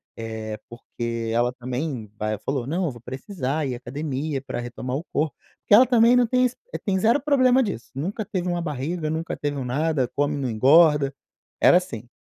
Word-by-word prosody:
eh, 110 -1 -5
porque 115 -1 -5
ela 120 +1 +2
também 125 -2 -4
aí 105 0 -1
ela 105 - -5
falou, 130 +1 -2
não, 175 +6 -1
eu 150 - -1
vou 120 -2 -12
precisar 135 +2 -3
ir 125 - -2
à - - -5
academia 140 +2 -3
para 130 -2 -5
retomar 125 +2 -5
o 155 - -3
corpo, 155 0 -1 0.2
porque - - 0
ela 245 +5 +9
também 240 0 +5
não 245 - +5
tem 250 +2 +3
ze 250 - -10 0.3
tem 195 -2 +1
zero 230 +8 +3
problema 265 -3 +4
disso 200 - -4
nunca 190 - -3
teve 180 -2 -3
uma 175 -1 -1
barriga, 155 +1 -3
nunca 160 +1 -3
teve 145 -1 -2
um 130 - -3
nada, 140 0 0
come 145 +1 +1
não 130 -3 -2
engorda, 140 +4 +5 0.5
era - - +7
assim, 120 - -5
145 Hz, 200 wpm, -24 LUFS, 125-180 Hz, 0.5 s, ela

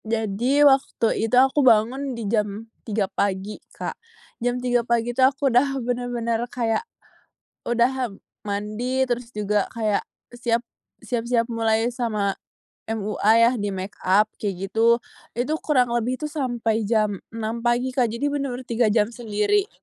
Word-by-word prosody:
Jadi, 225 +6 +2
waktu 265 -5 +2
itu 250 - +3
aku 265 +3 +5
bangun 255 +2 +3
di 230 - -4
jam 210 0 -1 0.2
3:00 210 -2 -1
pagi 195 +1 -2
Kak. - - -5 0.5
Jam 245 +1 0
3:00 245 -1 +1
pagi 235 0 0
itu 260 - -1
aku 270 0 +3
udah 270 +3 +3
benar-benar 240 -2 -2
kayak, 230 -3 0 0.8
udah 245 +1 +1 0.3
mandi, 215 +6 -1
terus 240 -1 -3
juga 210 -2 -1
kayak, 215 -3 0 0.3
siap 235 -1 -1 0.4
siap-siap 235 -1 0
mulai 225 0 0
sama 215 -5 -1 0.6
MUA 215 0 +1
ya, 230 +1 +6
di 205 - -1
make 190 0 -5
up 195 +3 +4 0.2
kayak 195 -2 -2
gitu. 230 +2 +4 0.4
Itu, 255 +6 0
kurang 250 -5 +2
lebih 240 +2 0
tuh - - -3
sampai 235 -7 -1
jam 215 -4 +1
6:00 225 +1 -4
pagi 240 +2 +1
Kak, 250 -3 +2
jadi 235 +5 -3
benar-benar 275 -3 -2
3 235 -1 +1
jam 210 +1 +1
sendiri. 235 - 0
235 Hz, 145 wpm, -23 LUFS, 215-250 Hz, 0.8 s, ya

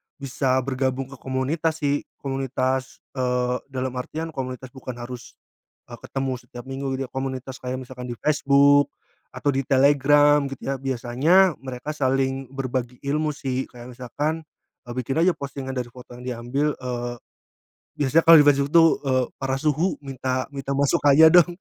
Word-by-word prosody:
bisa 135 -1 -1
bergabung 130 0 -2
ke 135 - -11
komunitas 150 +5 -2
sih. 145 0 0 0.2
Komunitas, 130 -1 -2
eee, 125 -1 0
dalam 130 -1 -3
artian, 160 +5 -5
komunitas 130 -3 -6
bukan 130 -2 -8
harus, 120 0 -9 0.6
eee, - - -9
ketemu 135 -1 -3
setiap 120 0 -11
minggu 135 +1 -5
gitu 135 - -3
ya, - - -38
komunitas 130 0 -5
kayak 130 +1 -4
misalkan 125 0 -9
di - - -5
Facebook 145 -1 +4 0.5
atau 145 - -1
di 135 0 -1
Telegram, 145 +2 +5
gitu 135 -1 -8
ya. - - -1
Biasanya 135 +9 +3
mereka 130 +2 -6
saling 135 -1 0
berbagi 130 -2 -3
ilmu 150 +2 0
sih. 130 -2 -2
Kayak 120 0 -11
misalkan, 150 +6 -3 0.4
eee, 120 - -5
bikin 135 +4 -2
aja 185 - +5
postingan 140 -1 -6
dari 125 -1 -2
foto 125 +1 -14
yang 125 - -10
diambil, 125 +5 -1
eee, 120 -1 -4 0.9
biasanya 145 +4 +3
kalau 165 -1 +11
di - - +2
Facebook 140 0 +1
tuh, 165 -1 +7 0.2
eee, 130 -1 +2 0.2
"Para 135 0 0
suhu, 155 +4 +1
minta 130 -2 -2
minta 140 0 -3
masukkannya 145 +1 +5
dong," 175 0 +5
135 Hz, 160 wpm, -24 LUFS, 130-145 Hz, 0.9 s, kalau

